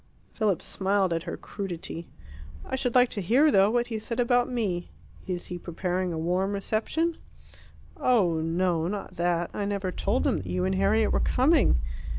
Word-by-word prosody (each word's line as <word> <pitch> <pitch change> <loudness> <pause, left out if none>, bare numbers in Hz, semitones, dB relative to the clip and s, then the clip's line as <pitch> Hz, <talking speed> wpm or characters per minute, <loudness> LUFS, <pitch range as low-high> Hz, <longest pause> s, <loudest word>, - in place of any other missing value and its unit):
Philip 210 -6 0
smiled 195 -2 0
at 165 - -1
her - - -4
crudity. 175 -4 -6 0.6
"I - - -3
should 255 -2 -1
like 250 -1 +6
to 205 - -3
hear, 260 - +4
though, 195 -2 +5
what 240 +1 +1
he 225 -2 -4
said 230 +2 -5
about 245 +1 +3
me. 195 -8 -2 0.4
Is 180 -2 -3
he 180 - -6
preparing 180 +1 -2
a 165 - -3
warm 180 +5 0
reception?" 230 +12 -1 0.8
"Oh, 190 -10 +2
no, 165 0 0
not 200 +2 -5
that. 175 0 0
I 205 - -2
never 200 -2 -2
told - - 0
him - - +2
that 95 - -6
you 90 0 -1
and 95 - +1
Harriet 100 - +2
were - - +2
coming. 270 - +3
195 Hz, 175 wpm, -27 LUFS, 175-230 Hz, 0.8 s, like